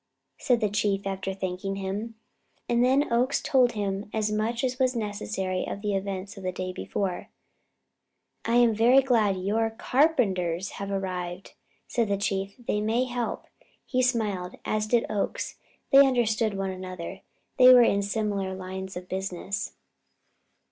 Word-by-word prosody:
said 245 Hz, -2 st, +2 dB
the 215 Hz, -, +3 dB
Chief, 205 Hz, -1 st, 0 dB
after 195 Hz, 0 st, -3 dB
thanking 190 Hz, +1 st, -3 dB
him. 200 Hz, +4 st, -4 dB, 0.5 s
And 240 Hz, 0 st, +2 dB
then 265 Hz, +1 st, +3 dB
Oakes 250 Hz, +4 st, +2 dB
told 250 Hz, -3 st, +3 dB
him 200 Hz, -1 st, -3 dB
as 215 Hz, -1 st, 0 dB
much 225 Hz, +3 st, -1 dB
as 255 Hz, 0 st, -1 dB
was 255 Hz, -1 st, +2 dB
necessary 205 Hz, -4 st, -2 dB
of 200 Hz, -, -5 dB
the 205 Hz, -1 st, 0 dB
events 195 Hz, +1 st, -4 dB
of -, -, -8 dB
the 185 Hz, -, -1 dB
day 185 Hz, 0 st, -4 dB
before. 185 Hz, -1 st, -3 dB, 1.1 s
"I 230 Hz, -, 0 dB
am 240 Hz, -2 st, +5 dB
very 245 Hz, +5 st, +5 dB
glad 220 Hz, -7 st, +2 dB
your 215 Hz, +4 st, 0 dB
carpenters 210 Hz, -, +1 dB
have 200 Hz, -, -4 dB
arrived," 185 Hz, -2 st, -4 dB, 0.3 s
said 235 Hz, -3 st, 0 dB
the 200 Hz, 0 st, 0 dB
Chief; 195 Hz, -1 st, -2 dB
"they 230 Hz, -4 st, -2 dB
may 225 Hz, +4 st, +1 dB
help." 245 Hz, -2 st, -3 dB, 0.4 s
He 255 Hz, -1 st, 0 dB
smiled, 210 Hz, -8 st, 0 dB
as 215 Hz, 0 st, 0 dB
did 235 Hz, +1 st, +2 dB
Oakes. 215 Hz, -, -3 dB, 0.3 s
They 275 Hz, -, +8 dB
understood 230 Hz, -5 st, +1 dB
one 195 Hz, -1 st, -2 dB
another 185 Hz, 0 st, -7 dB, 0.4 s
they 255 Hz, 0 st, +10 dB
were 250 Hz, -1 st, +9 dB
in 200 Hz, -3 st, +3 dB
similar 200 Hz, -2 st, -2 dB
lines 190 Hz, 0 st, -6 dB
of 180 Hz, 0 st, -8 dB
business. 190 Hz, +1 st, -4 dB
205 Hz, 155 wpm, -27 LUFS, 190-235 Hz, 1.1 s, they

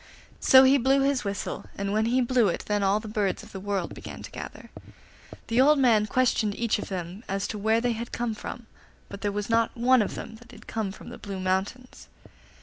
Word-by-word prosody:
So 260 Hz, 0 st, +7 dB
he 270 Hz, +1 st, +5 dB
blew 270 Hz, +3 st, +3 dB
his 275 Hz, -1 st, +1 dB
whistle, 200 Hz, -1 st, -4 dB
and 200 Hz, 0 st, -2 dB
when 215 Hz, +1 st, +2 dB
he 250 Hz, +2 st, +2 dB
blew 245 Hz, -2 st, +3 dB
it 175 Hz, -, -2 dB
then 210 Hz, -1 st, 0 dB
all 200 Hz, +1 st, +2 dB
the 215 Hz, -, -9 dB
birds 210 Hz, -3 st, -1 dB
of -, -, -13 dB
the 190 Hz, -, -7 dB
world 195 Hz, -2 st, -3 dB
began -, -, -9 dB
to -, -, -9 dB
gather. -, -, -9 dB, 0.7 s
The 235 Hz, +2 st, +2 dB
old 295 Hz, +3 st, +5 dB
man 225 Hz, -6 st, +4 dB
questioned 220 Hz, -3 st, +1 dB
each 230 Hz, -2 st, 0 dB
of -, -, -6 dB
them 185 Hz, +2 st, -5 dB
as 195 Hz, +1 st, -1 dB
to 215 Hz, -, -4 dB
where 220 Hz, +2 st, +2 dB
they 245 Hz, 0 st, +1 dB
had 230 Hz, +1 st, -5 dB
come 240 Hz, -2 st, -2 dB
from, 235 Hz, +2 st, -8 dB, 0.4 s
but 200 Hz, 0 st, -9 dB
there 205 Hz, -, 0 dB
was 205 Hz, 0 st, -3 dB
not 230 Hz, 0 st, +1 dB
one 250 Hz, +1 st, +4 dB
of 210 Hz, -, -2 dB
them 225 Hz, -, -8 dB
that 235 Hz, +1 st, -18 dB
had 225 Hz, -3 st, -14 dB
come 220 Hz, -3 st, -3 dB
from -, -, -11 dB
the -, -, -10 dB
Blue 195 Hz, -2 st, -6 dB
Mountains. 190 Hz, +7 st, -3 dB
220 Hz, 230 wpm, -26 LUFS, 200-245 Hz, 0.7 s, So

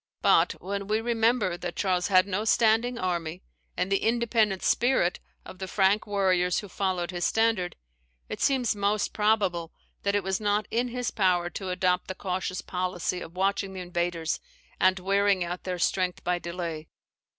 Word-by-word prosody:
But, -, -, +4 dB
when 200 Hz, +2 st, -5 dB
we 215 Hz, +1 st, +1 dB
remember 225 Hz, -5 st, +1 dB
that 175 Hz, -1 st, -5 dB
Charles 180 Hz, -3 st, +1 dB
had 185 Hz, -2 st, +5 dB
no 200 Hz, +1 st, -2 dB
standing 230 Hz, +2 st, +3 dB
army, 175 Hz, -3 st, -3 dB, 0.3 s
and 190 Hz, -, -1 dB
the 195 Hz, -, +3 dB
independent 225 Hz, -4 st, +1 dB
spirit 240 Hz, -8 st, +2 dB, 0.3 s
of 185 Hz, -, -11 dB
the 190 Hz, -, -4 dB
Frank 195 Hz, +3 st, +2 dB
warriors 185 Hz, -3 st, +2 dB
who 205 Hz, -, -3 dB
followed 185 Hz, -2 st, -2 dB
his 175 Hz, -1 st, -4 dB
standard, 225 Hz, -6 st, +1 dB, 0.5 s
it -, -, -6 dB
seems 255 Hz, -5 st, +2 dB
most 205 Hz, +1 st, 0 dB
probable 200 Hz, -6 st, +1 dB, 0.3 s
that 200 Hz, 0 st, 0 dB
it 205 Hz, -, +1 dB
was 190 Hz, 0 st, -1 dB
not 205 Hz, 0 st, +1 dB
in 240 Hz, +2 st, +1 dB
his 245 Hz, 0 st, -3 dB
power 180 Hz, -4 st, +1 dB
to 190 Hz, +3 st, -5 dB
adopt 180 Hz, 0 st, +1 dB
the 185 Hz, -, -5 dB
cautious 185 Hz, -1 st, -3 dB
policy 180 Hz, 0 st, -2 dB
of 165 Hz, -, -9 dB
watching 195 Hz, 0 st, 0 dB
the 185 Hz, -, -6 dB
invaders, 175 Hz, -2 st, -2 dB, 0.4 s
and 185 Hz, 0 st, +4 dB
wearing 195 Hz, 0 st, +2 dB
out 175 Hz, +1 st, -5 dB
their 180 Hz, -1 st, -2 dB
strength 180 Hz, +1 st, 0 dB
by 180 Hz, 0 st, 0 dB
delay. 170 Hz, -3 st, -5 dB
190 Hz, 170 wpm, -27 LUFS, 180-210 Hz, 0.5 s, had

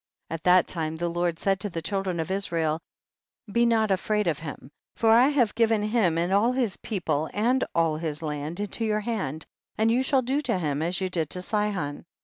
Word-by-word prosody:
26. 165 Hz, -, -3 dB
At -, -, -44 dB
that 180 Hz, 0 st, +5 dB
time 160 Hz, -2 st, -3 dB
the 170 Hz, +1 st, -2 dB
Lord 175 Hz, -1 st, -1 dB
said 195 Hz, +1 st, +1 dB
to 205 Hz, -, -3 dB
the 165 Hz, -3 st, -5 dB
children 195 Hz, -2 st, -2 dB
of 160 Hz, +3 st, -2 dB
Israel, 165 Hz, -5 st, 0 dB, 0.7 s
be 235 Hz, +2 st, +3 dB
not 220 Hz, -3 st, +2 dB
afraid 210 Hz, +2 st, +1 dB
of 160 Hz, -4 st, 0 dB
him, 140 Hz, -3 st, -8 dB, 0.2 s
for 225 Hz, -1 st, +3 dB
I 240 Hz, +4 st, +7 dB
have 265 Hz, -7 st, +2 dB
given 225 Hz, -2 st, +2 dB
him 210 Hz, -7 st, +2 dB
and 175 Hz, +3 st, 0 dB
all 220 Hz, +5 st, +3 dB
his 245 Hz, -7 st, 0 dB
people 160 Hz, -7 st, -2 dB
and 245 Hz, +5 st, +2 dB
all 165 Hz, -2 st, +2 dB
his 155 Hz, -1 st, -4 dB
land 150 Hz, +3 st, -4 dB
into 205 Hz, +2 st, -2 dB
your 215 Hz, -1 st, +1 dB
hand, 195 Hz, -, -3 dB, 0.3 s
and 220 Hz, +1 st, +3 dB
you 245 Hz, +3 st, +3 dB
shall 265 Hz, 0 st, +2 dB
do 270 Hz, +4 st, 0 dB
to 245 Hz, -8 st, 0 dB
him 150 Hz, -4 st, -1 dB
as 175 Hz, +3 st, -1 dB
you 190 Hz, -, +1 dB
did 165 Hz, -4 st, -2 dB
to 180 Hz, -, -4 dB
Sihon. 195 Hz, -10 st, -2 dB
190 Hz, 215 wpm, -26 LUFS, 165-220 Hz, 0.7 s, I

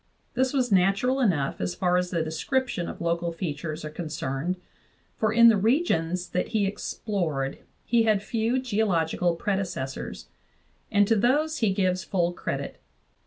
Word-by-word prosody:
This 260 Hz, +1 st, +1 dB
was 255 Hz, -4 st, 0 dB
natural 195 Hz, +8 st, +3 dB
enough 165 Hz, -, +1 dB
as 90 Hz, 0 st, -2 dB
far 180 Hz, -, +1 dB
as 180 Hz, 0 st, +1 dB
the 170 Hz, -2 st, 0 dB
description 175 Hz, -, -1 dB
of -, -, -8 dB
local 170 Hz, 0 st, 0 dB
features 155 Hz, -2 st, -4 dB
are 150 Hz, -, -5 dB
concerned, 155 Hz, 0 st, -3 dB, 0.6 s
for 215 Hz, -1 st, +1 dB
in 235 Hz, +1 st, +7 dB
the 225 Hz, -2 st, +6 dB
regions 185 Hz, -, +1 dB
that 180 Hz, -, -1 dB
he 210 Hz, -2 st, +1 dB
explored 175 Hz, -8 st, -2 dB, 0.3 s
he 235 Hz, -1 st, +3 dB
had 215 Hz, -3 st, +2 dB
few 230 Hz, +3 st, 0 dB
geo 220 Hz, -4 st, 0 dB
logical 170 Hz, -1 st, +1 dB
predecessors, 180 Hz, -9 st, -3 dB, 0.6 s
and 205 Hz, -1 st, +4 dB
to 225 Hz, -, +4 dB
those 290 Hz, +9 st, +2 dB
he 220 Hz, -4 st, +2 dB
gives 185 Hz, -1 st, 0 dB
full 175 Hz, -3 st, 0 dB
credit. -, -, -5 dB
190 Hz, 155 wpm, -26 LUFS, 170-225 Hz, 0.6 s, in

